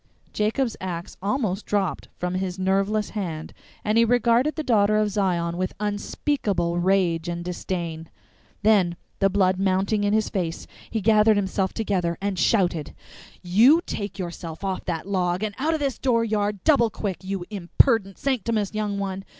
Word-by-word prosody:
Jacob's 225 +3 0
axe 175 -2 -5
almost 205 -2 -1
dropped 195 -4 -1
from 180 0 -2
his 185 0 -2
nerveless 195 +3 0
hand, 170 -7 -5 0.3
and 215 +2 +3
he - - +6
regarded 245 +4 +3
the 310 - -3
Daughter 215 -5 +3
of 210 -1 +1
Zion 175 -4 0
with 185 0 -2
unspeakable 205 -4 -1
rage 175 -2 +1
and 170 0 -4
disdain. 170 -2 -4 0.5
Then, 195 -5 +4 0.2
the 195 - +4
blood 185 -1 +2
mounting 195 +2 +1
in 205 - +2
his 215 0 +2
face, 175 -4 -3 0.2
he 220 - -2
gathered 215 0 +5
himself 190 -1 0
together, 180 -6 -1
and 195 -2 -2
shouted: 175 -8 +1 0.5
"You 225 - +6
take 200 0 -5
yourself 170 -2 -6
off 190 -1 -3
that 170 0 -3
log 180 -1 0
and 215 -1 -2
out 315 +4 +1
o' - - 0
this 280 -4 -2
dooryard 215 -5 0
double 270 -7 +4
quick, 200 -4 -4
you 190 -1 -4
imperdent 195 +1 +2
sanct'omus 230 -6 -1
young 210 -1 -2
one! 195 -1 -3
195 Hz, 160 wpm, -24 LUFS, 180-215 Hz, 0.5 s, he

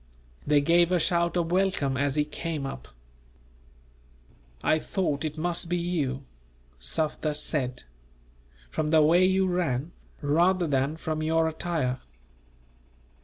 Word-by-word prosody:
They 145 -1 +4
gave 170 +3 +4
a 180 - +4
shout 170 +1 +1
of 170 -1 -1
welcome, 185 -8 +1
as 140 +1 0
he 150 -1 +2
came 155 -1 -4
up. 65 - -7 1.8
"I 155 - +3
thought 155 -5 -2
it 155 0 -4
must 170 +1 -1
be 175 - +1
you," 150 -6 -2 0.6
Sufder 150 - -1
said, 140 - -2 0.9
"from 155 -1 -1
the 155 -1 +5
way 170 +4 +5
you 190 +1 +3
ran, 170 -5 -1 0.3
rather 175 +5 +3
than 140 +1 0
from 155 -1 -3
your 160 +1 +2
attire. 160 -6 -2
160 Hz, 125 wpm, -27 LUFS, 145-175 Hz, 1.8 s, the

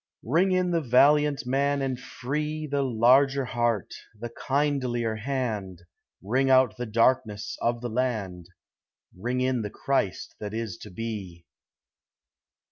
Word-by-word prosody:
Ring 170 - +2
in 185 -1 +1
the 170 -1 +1
valiant 145 +2 +4
man 140 +2 +1
and 130 -2 -2
free, 150 +5 -4
The 140 -1 -1
larger 135 +2 +4
heart, 120 -5 -1 0.3
the 120 +1 -6
kindlier 130 -5 -1
hand; 110 -8 -3 0.4
Ring 130 +7 +1
out 130 -4 +5
the 125 +1 -5
darkness 110 -2 +1
of 120 0 0
the 120 - -3
land, 105 -8 -2 0.7
Ring 120 +7 -2
in 130 -2 +1
the 105 - -4
Christ 120 -5 -2
that 105 0 -5
is 110 -5 -4
to 105 - -11
be. 95 -4 -6
125 Hz, 130 wpm, -26 LUFS, 110-140 Hz, 0.7 s, out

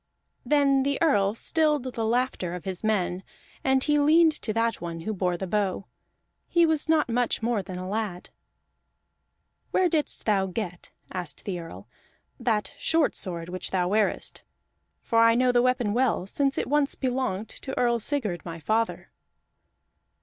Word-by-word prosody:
Then 280 -2 +3
the 280 +1 0
Earl 205 -11 +3
stilled 300 +1 +1
the 245 -3 -4
laughter 225 -6 0
of 180 - -8
his 190 0 -4
men, 190 -4 0 0.4
and 265 0 +3
he 295 -1 +2
leaned 315 +3 +5
to 215 - -2
that 230 +1 0
one 170 -1 -5
who 215 +6 -3
bore 180 -3 -1
the 190 - -4
bow; 195 0 -1 0.6
he 340 -1 +4
was 320 -1 0
not 315 -2 +3
much 240 -1 0
more 230 -2 +1
than 185 -1 -7
a 185 0 -5
lad. 200 -3 -4 1.4
"Where 370 - +3
didst 315 -3 -1
thou 195 -3 +2
get," 180 -2 -5 0.2
asked 175 -5 -5
the 185 -3 -3
Earl, 165 -1 -10 0.5
"that 225 -4 0
short 325 -2 +2
sword 170 -3 -5
which 185 +1 -4
thou 180 -2 0
wearest? 210 +1 0 0.6
For 230 - +2
I 230 0 +6
know 250 +1 +3
the 245 0 +4
weapon 250 -4 +1
well, 240 -6 +1
since 275 +7 0
once 290 0 +1
it - - -35
belonged 250 -6 -1
to 265 - -7
Earl 240 -1 +2
Sigurd 220 - -2
my 165 -1 -7
father." 225 +7 -1
225 Hz, 165 wpm, -26 LUFS, 190-265 Hz, 1.4 s, I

